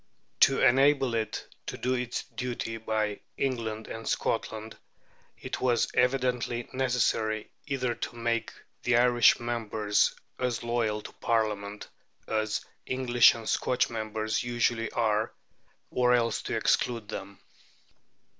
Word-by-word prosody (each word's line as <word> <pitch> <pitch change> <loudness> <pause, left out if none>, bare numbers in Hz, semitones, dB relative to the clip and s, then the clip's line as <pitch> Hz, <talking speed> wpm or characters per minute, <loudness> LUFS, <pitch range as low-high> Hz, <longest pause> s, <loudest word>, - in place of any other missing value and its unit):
To - - +5
enable 135 0 +4
it 110 -2 -2 0.2
to - - -4
do 125 +1 0
its 125 -1 -2
duty 120 -3 -4
by 110 -2 -1 0.2
England 115 -5 -2
and 115 0 -7
Scotland, 110 -1 -2 0.6
it - - -5
was 120 -2 +2
evidently 125 -2 +1
necessary, 115 -4 0 0.2
either 130 -4 0
to 120 - -5
make 115 -1 -1 0.3
the 125 -1 +3
Irish 120 -1 +5
members 110 -3 0 0.2
as 125 -2 -1
loyal 115 -3 0
to - - -9
Parliament 105 -3 -1 0.4
as 110 -1 -1 0.2
English 125 -2 +5
and 115 -2 -8
Scotch 125 - +1
members 110 -1 -2
usually 120 -1 0
are, 110 -1 +1 0.6
or 125 0 +4
else 115 -2 +1
to - - -3
exclude 115 -4 +1
them. 100 -2 -6
115 Hz, 120 wpm, -28 LUFS, 110-125 Hz, 0.6 s, To